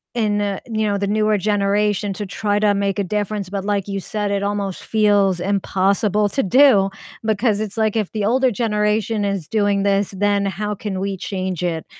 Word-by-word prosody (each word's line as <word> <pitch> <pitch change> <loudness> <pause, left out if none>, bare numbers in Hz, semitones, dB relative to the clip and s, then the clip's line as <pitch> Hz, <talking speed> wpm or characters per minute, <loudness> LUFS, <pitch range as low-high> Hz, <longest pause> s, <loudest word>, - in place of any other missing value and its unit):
in, 210 -3 +1
uh, 200 -1 -2
you 220 -2 -1
know, 200 -1 0
the 200 - -1
newer 215 0 +2
generation 205 0 0
to 205 +2 -5
try 205 +1 -1
to 210 -1 +3
make 200 -1 -1
a - - +1
difference, 205 0 -2
but 195 0 -3
like 200 -1 -1
you 195 -1 -3
said, 210 +1 -3
it 200 -1 0
almost 200 -2 -3
feels 205 -4 +2
impossible 200 +2 +1
to 270 - 0
do 215 -3 +5 0.3
because 215 0 +1
it's 215 0 -5
like 220 -1 +1
if 215 -4 -1
the 210 -2 -2
older 260 +4 +3
generation 210 -1 0
is 200 -6 -2
doing 205 -2 +1
this, 200 -1 +1
then 205 0 +1
how 210 +2 -3
can 195 -1 -4
we 195 0 -2
change 185 -2 -4
it? 165 -3 -2
205 Hz, 195 wpm, -20 LUFS, 195-210 Hz, 0.3 s, do